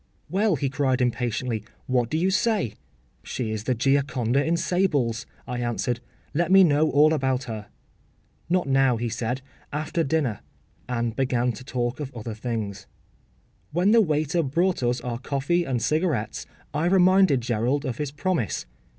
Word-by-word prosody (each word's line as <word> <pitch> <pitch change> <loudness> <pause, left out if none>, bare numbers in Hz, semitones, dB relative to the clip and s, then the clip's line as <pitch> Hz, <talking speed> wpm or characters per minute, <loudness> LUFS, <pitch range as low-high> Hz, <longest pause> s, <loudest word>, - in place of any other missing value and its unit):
‘Well,’ 200 0 +2
he 140 0 -1
cried 135 -1 +1
impatiently, 120 -2 -1 0.2
‘what 125 -2 +1
do 155 - 0
you 185 +4 +2
say?’ 205 - +1 0.5
‘She 115 -4 -4
is 110 0 -4
the 130 - +1
Gioconda 135 0 +1
in 165 +2 +1
sables,’ 145 -10 0 0.2
I 125 0 -4
answered. 120 0 -1 0.3
‘Let 170 +3 +1
me 190 0 +8
know 155 -2 +3
all 150 +2 +5
about 130 -3 0
her.’ 110 -3 -6 0.8
‘Not 180 -3 +1
now,’ 135 -2 +3
he 120 +1 -2
said; 120 +3 -3 0.3
‘after 155 +3 -1
dinner,’ 135 -8 0 0.5
and 120 -2 -1
began 125 -2 +1
to 120 +3 -9
talk 125 -1 -2
of 140 -3 -5
other 115 -1 -5
things. 105 -3 -4 0.9
When 180 +5 +3
the 230 0 +7
waiter 155 -1 +1
brought 170 +5 +1
us 120 0 0
our 120 -1 -4
coffee 140 +6 0
and 130 -4 -1
cigarettes 150 -5 -1 0.3
I 155 +3 +1
reminded 185 -6 +5
Gerald 120 +5 0
of 125 -4 -3
his 150 -2 -1
promise. 155 - -1
135 Hz, 160 wpm, -25 LUFS, 120-160 Hz, 0.9 s, me